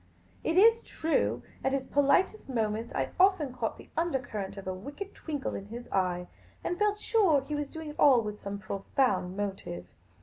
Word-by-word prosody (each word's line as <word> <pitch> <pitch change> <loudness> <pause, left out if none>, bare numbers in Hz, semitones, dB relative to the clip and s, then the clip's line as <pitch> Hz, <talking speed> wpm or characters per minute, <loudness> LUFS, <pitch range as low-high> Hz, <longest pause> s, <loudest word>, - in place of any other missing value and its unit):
It 330 - +1
is 455 +4 +7
true, 320 0 0 0.2
at 265 - +1
his 270 -1 0
politest 285 +8 +2
moments, 225 -2 -1
I - - -1
often 365 -8 +4
caught 235 -3 -2
the - - -14
undercurrent 255 - -2
of 195 - -7
a 185 - -2
wicked 285 - -7
twinkle 290 -4 -4
in 195 - -6
his 240 +3 -8
eye, 180 -2 +1 0.4
and 350 - -2
felt 420 0 +2
sure 390 - +3
he 275 +3 -6
was 295 -1 -2
doing 320 -1 -7
it 295 - -10
all 255 -5 +7
with 210 -1 -5
some 200 0 -4
profound 200 -1 0
motiv^e. 195 - -4
265 Hz, 180 wpm, -30 LUFS, 205-320 Hz, 0.4 s, is